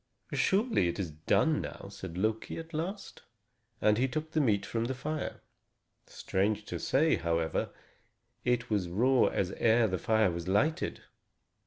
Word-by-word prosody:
"Surely, 200 Hz, -, +2 dB
it 85 Hz, -, -2 dB
is 90 Hz, -6 st, -3 dB
done 115 Hz, -, +2 dB
now," -, -, -7 dB
said 95 Hz, -3 st, -8 dB
Loki, 110 Hz, +3 st, -1 dB
at 165 Hz, +1 st, -8 dB
last; 190 Hz, +6 st, -4 dB, 0.6 s
and 105 Hz, +1 st, +3 dB
he 130 Hz, -, +3 dB
took 155 Hz, +4 st, -4 dB
the 155 Hz, -, +2 dB
meat 105 Hz, -7 st, +2 dB
from 115 Hz, 0 st, -2 dB
the 130 Hz, +2 st, -2 dB
fire. 155 Hz, +3 st, -4 dB, 0.7 s
Strange 105 Hz, +2 st, -1 dB
to -, -, -5 dB
say, 155 Hz, +4 st, +2 dB
however, 85 Hz, -1 st, -1 dB, 0.7 s
it 125 Hz, -1 st, +1 dB
was 95 Hz, -5 st, 0 dB
raw 125 Hz, +8 st, +3 dB
as 95 Hz, -1 st, 0 dB
ere 115 Hz, 0 st, +4 dB
the 95 Hz, -2 st, -2 dB
fire 110 Hz, -2 st, +3 dB
was 85 Hz, +1 st, -5 dB
lighted. 145 Hz, -, 0 dB
110 Hz, 155 wpm, -31 LUFS, 95-150 Hz, 0.7 s, ere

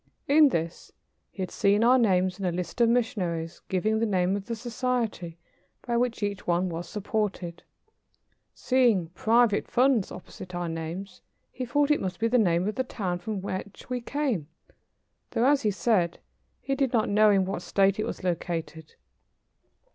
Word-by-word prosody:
In 295 Hz, +1 st, +6 dB
this 165 Hz, -6 st, -3 dB, 0.4 s
he 190 Hz, -, -5 dB
had 180 Hz, -, -5 dB
seen 205 Hz, +2 st, +2 dB
our 255 Hz, +2 st, +6 dB
names 185 Hz, -4 st, +2 dB
in 195 Hz, -, -3 dB
a 180 Hz, -, +1 dB
list 180 Hz, +6 st, -4 dB
of 230 Hz, -, +5 dB
missionaries, 185 Hz, -9 st, -1 dB
giving 215 Hz, +4 st, +1 dB
the 230 Hz, -, +1 dB
name 185 Hz, -1 st, +1 dB
of 200 Hz, -1 st, -5 dB
the 230 Hz, -, -2 dB
society 230 Hz, -7 st, -2 dB, 0.5 s
by 240 Hz, -, -1 dB
which 235 Hz, -2 st, 0 dB
each 200 Hz, -1 st, -3 dB
was 175 Hz, -1 st, -1 dB
supported. 205 Hz, -4 st, -3 dB, 0.9 s
Seeing 235 Hz, -10 st, +2 dB
"Private 220 Hz, +4 st, +2 dB
Funds" 250 Hz, -5 st, +2 dB
opposite 180 Hz, 0 st, -9 dB
our 175 Hz, 0 st, -2 dB
names, 165 Hz, +4 st, -6 dB, 0.3 s
he 255 Hz, -, -5 dB
thought 290 Hz, +4 st, +2 dB
it 295 Hz, -, +2 dB
must 185 Hz, -2 st, -4 dB
be 225 Hz, -, +2 dB
the 245 Hz, +2 st, +3 dB
name 175 Hz, -3 st, +2 dB
of 215 Hz, -, -1 dB
the 260 Hz, -, -1 dB
town 185 Hz, -8 st, -3 dB
from 200 Hz, +2 st, -4 dB
which 195 Hz, +4 st, -6 dB
we 250 Hz, -1 st, -1 dB
came, 245 Hz, -, -2 dB, 0.8 s
though, 235 Hz, +1 st, +1 dB
as 285 Hz, +1 st, +4 dB
he 215 Hz, -, +1 dB
said, 195 Hz, -4 st, +1 dB, 0.4 s
he 275 Hz, -, -2 dB
did 270 Hz, -2 st, 0 dB
not 220 Hz, -3 st, +2 dB
know 210 Hz, +1 st, +5 dB
in 195 Hz, -2 st, +3 dB
what 195 Hz, -, -3 dB
state 195 Hz, +1 st, +2 dB
it 215 Hz, -, 0 dB
was -, -, -6 dB
located. 165 Hz, -3 st, -4 dB
205 Hz, 170 wpm, -27 LUFS, 180-235 Hz, 0.9 s, In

